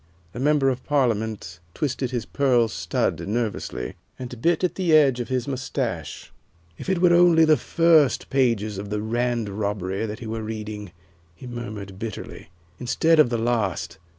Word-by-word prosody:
The 120 Hz, -, -8 dB
member 145 Hz, 0 st, +3 dB
of 130 Hz, -1 st, -3 dB
Parliament 110 Hz, -, -1 dB, 0.2 s
twisted 130 Hz, -3 st, -1 dB
his 120 Hz, -2 st, -3 dB
pearl 125 Hz, -5 st, +2 dB
stud -, -, -1 dB
nervously, 105 Hz, -, -3 dB, 0.2 s
and 125 Hz, -2 st, -8 dB
bit 170 Hz, +5 st, +2 dB
at 180 Hz, -, +1 dB
the 180 Hz, -4 st, 0 dB
edge 140 Hz, -5 st, +5 dB
of 120 Hz, -, -3 dB
his 130 Hz, 0 st, -2 dB
mustache. 125 Hz, -, -4 dB, 0.5 s
"If -, -, -6 dB
it 190 Hz, -, +2 dB
only 175 Hz, -2 st, +6 dB
were -, -, +6 dB
the 155 Hz, -1 st, +5 dB
first 160 Hz, 0 st, +3 dB
pages 115 Hz, -6 st, +1 dB
of 100 Hz, 0 st, -6 dB
'The 105 Hz, 0 st, -2 dB
Rand 120 Hz, +1 st, -1 dB
Robbery' 100 Hz, 0 st, -2 dB
that 105 Hz, 0 st, -5 dB
he -, -, -9 dB
were 110 Hz, 0 st, -4 dB
reading," 105 Hz, -2 st, -6 dB, 0.4 s
he 125 Hz, -, -12 dB
murmured 105 Hz, -6 st, -7 dB
bitterly, 110 Hz, -6 st, -7 dB, 0.3 s
"instead 160 Hz, +6 st, +2 dB
of 150 Hz, -, +6 dB
the 120 Hz, -, 0 dB
last! 115 Hz, -8 st, -1 dB
120 Hz, 165 wpm, -24 LUFS, 105-140 Hz, 0.5 s, only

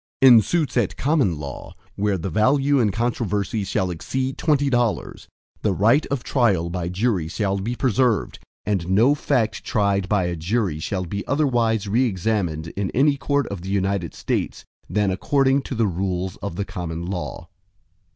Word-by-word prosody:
VII -, -, +9 dB
In 120 Hz, -3 st, +9 dB
suits 155 Hz, +3 st, -1 dB
at 115 Hz, -6 st, 0 dB
common 135 Hz, -, +1 dB
law, 70 Hz, -3 st, -8 dB, 0.2 s
where 100 Hz, -1 st, 0 dB
the 90 Hz, +2 st, -4 dB
value 135 Hz, -, +3 dB
in 110 Hz, -4 st, +3 dB
controversy 110 Hz, -2 st, -1 dB
shall 95 Hz, -1 st, -1 dB
exceed 130 Hz, +10 st, -3 dB
twenty 145 Hz, -1 st, +1 dB
dollars, 120 Hz, -5 st, -1 dB, 0.3 s
the 105 Hz, -, +1 dB
right 115 Hz, -, +3 dB
of 135 Hz, -3 st, -3 dB
trial 95 Hz, -, +1 dB
by 85 Hz, -1 st, -3 dB
jury 95 Hz, -3 st, 0 dB
shall 100 Hz, +3 st, -1 dB
be 115 Hz, +6 st, -3 dB
preserved, 125 Hz, -2 st, +1 dB, 0.3 s
and 95 Hz, -4 st, -1 dB
no 115 Hz, +9 st, +4 dB
fact 125 Hz, -7 st, 0 dB
tried 100 Hz, -2 st, 0 dB
by 105 Hz, -3 st, +2 dB
a 90 Hz, 0 st, -2 dB
jury 90 Hz, -1 st, -1 dB
shall 90 Hz, +3 st, -3 dB
be 100 Hz, +4 st, -4 dB
otherwise 120 Hz, -8 st, +1 dB
re 115 Hz, +6 st, +2 dB
examined 90 Hz, -6 st, -1 dB
in 95 Hz, +2 st, -3 dB
any 140 Hz, +3 st, +4 dB
court 140 Hz, 0 st, 0 dB
of 100 Hz, -4 st, -5 dB
the 95 Hz, -, -7 dB
United 95 Hz, -3 st, -1 dB
States, -, -, -3 dB, 0.2 s
than 105 Hz, -2 st, +1 dB
according 135 Hz, +7 st, +2 dB
to 130 Hz, -, -6 dB
the 115 Hz, -1 st, +2 dB
rules 95 Hz, -1 st, -2 dB
of 100 Hz, -4 st, -6 dB
the 100 Hz, -, -2 dB
common 85 Hz, -2 st, -5 dB
law. 90 Hz, -1 st, -5 dB
105 Hz, 170 wpm, -22 LUFS, 95-125 Hz, 0.3 s, VII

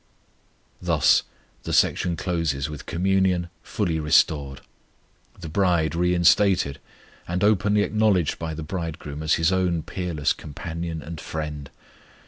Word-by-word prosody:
Thus -, -, +4 dB, 0.4 s
the -, -, -5 dB
section 85 Hz, -2 st, +2 dB
closes 80 Hz, -5 st, -1 dB
with 75 Hz, -, -9 dB
communion 90 Hz, 0 st, +1 dB
fully 80 Hz, -2 st, -2 dB
restored; 75 Hz, -3 st, +2 dB, 0.8 s
the 85 Hz, -, -7 dB
bride 85 Hz, -2 st, +1 dB
reinstated 90 Hz, -3 st, +3 dB, 0.5 s
and 90 Hz, +2 st, -1 dB
openly 105 Hz, 0 st, +3 dB
acknowledged 105 Hz, -7 st, +1 dB
by 80 Hz, -1 st, -4 dB
the 80 Hz, -, -6 dB
Bridegroom 75 Hz, -3 st, -5 dB
as 80 Hz, 0 st, +2 dB
His 80 Hz, +2 st, +2 dB
own 90 Hz, -3 st, +1 dB
peerless 85 Hz, -6 st, -1 dB
companion 80 Hz, +2 st, -6 dB
and 80 Hz, 0 st, -7 dB
friend. 75 Hz, -3 st, -5 dB
85 Hz, 115 wpm, -24 LUFS, 75-90 Hz, 0.8 s, Thus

